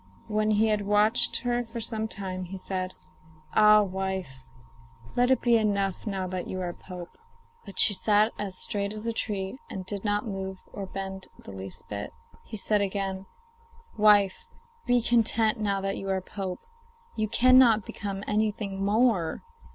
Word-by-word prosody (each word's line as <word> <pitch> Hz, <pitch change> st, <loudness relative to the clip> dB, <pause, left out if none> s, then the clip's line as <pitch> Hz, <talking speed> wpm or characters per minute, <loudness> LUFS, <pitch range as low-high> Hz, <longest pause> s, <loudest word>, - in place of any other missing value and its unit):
When 215 Hz, -1 st, +1 dB
he 215 Hz, +1 st, +3 dB
had 210 Hz, -2 st, 0 dB
watched 210 Hz, +2 st, +3 dB
her 245 Hz, -1 st, 0 dB
for 230 Hz, 0 st, -7 dB
some 220 Hz, -1 st, -3 dB
time 185 Hz, -3 st, -5 dB
he 190 Hz, +2 st, -7 dB
said: 185 Hz, -1 st, -4 dB, 0.6 s
'Ah, 210 Hz, 0 st, +7 dB
wife, 190 Hz, -9 st, -4 dB, 0.7 s
let 245 Hz, +1 st, +3 dB
it 260 Hz, -, +3 dB
be 235 Hz, -1 st, +4 dB
enough 200 Hz, -2 st, 0 dB
now 195 Hz, -2 st, -2 dB
that 185 Hz, -1 st, -4 dB
you 185 Hz, -, -4 dB
are 175 Hz, -1 st, -3 dB
pope.' 180 Hz, -, -10 dB, 0.5 s
But 200 Hz, -, -10 dB
she 210 Hz, -, +6 dB
sat 210 Hz, +2 st, +3 dB
as 195 Hz, -3 st, -3 dB
straight 200 Hz, 0 st, -1 dB
as 215 Hz, +1 st, -6 dB
a 230 Hz, -, -1 dB
tree, 200 Hz, +1 st, -3 dB
and 190 Hz, -1 st, -6 dB
did 200 Hz, +1 st, -5 dB
not 205 Hz, 0 st, 0 dB
move 190 Hz, -2 st, -4 dB, 0.2 s
or 195 Hz, -2 st, -5 dB
bend 190 Hz, 0 st, -6 dB
the -, -, -11 dB
least 95 Hz, 0 st, -8 dB
bit. 100 Hz, -1 st, -5 dB, 0.3 s
He 220 Hz, -, -8 dB
said 210 Hz, +1 st, +1 dB
again: 195 Hz, -1 st, -2 dB, 0.7 s
'Wife, 210 Hz, -, +4 dB, 0.4 s
be 245 Hz, -1 st, +3 dB
content 225 Hz, -2 st, +2 dB
now 200 Hz, -2 st, 0 dB
that 195 Hz, 0 st, -2 dB
you 195 Hz, -, -5 dB
are 190 Hz, 0 st, +1 dB
pope. 185 Hz, 0 st, -6 dB, 0.5 s
You 215 Hz, -1 st, 0 dB
cannot 240 Hz, -2 st, +5 dB
become 200 Hz, -1 st, -5 dB
anything 210 Hz, -2 st, -1 dB
more. 205 Hz, -5 st, +2 dB
205 Hz, 165 wpm, -27 LUFS, 190-215 Hz, 0.7 s, Ah